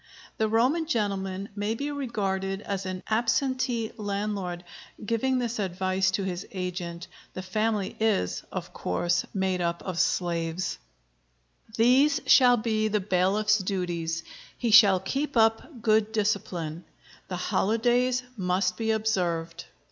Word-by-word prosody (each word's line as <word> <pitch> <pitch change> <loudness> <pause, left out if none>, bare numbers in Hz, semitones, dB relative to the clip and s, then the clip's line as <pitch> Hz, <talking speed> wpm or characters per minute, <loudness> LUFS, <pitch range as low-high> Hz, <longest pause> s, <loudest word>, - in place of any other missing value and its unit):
The 220 - +2
Roman 260 +9 +2
gentleman 195 - -2
may 205 +2 -1
be 285 +4 -3
regarded 195 -8 -2
as 195 -2 -3
an 185 0 -5
"absentee 240 0 0
landlord," 200 -4 -3 0.4
giving 245 +4 +1
this 240 -2 -2
advice 185 0 0
to 200 - -3
his 180 -1 -3
agent. 180 -2 -4 0.3
The 185 - -5
"family" 210 +1 -1
is, 215 - +1
of - - -6
course, 175 - 0
made 190 -2 -1
up 170 0 -2
of 180 -3 -4
slaves.] 175 -1 -1 1.0
These 260 +6 +4
shall 245 -2 +6
be 215 -1 0
the 210 0 +1
bailiff's 200 +3 +2
duties. 175 -4 -2 0.3
He 235 -2 -1
shall 200 -4 +8
keep 275 +8 -2
up 225 +3 +1
good 220 -1 +3
discipline. 185 -6 -2 0.4
The 180 - -4
holidays 245 +7 +1
must 185 -2 0
be 225 -1 -2
observed. 180 -7 -1
200 Hz, 125 wpm, -27 LUFS, 185-225 Hz, 1.0 s, shall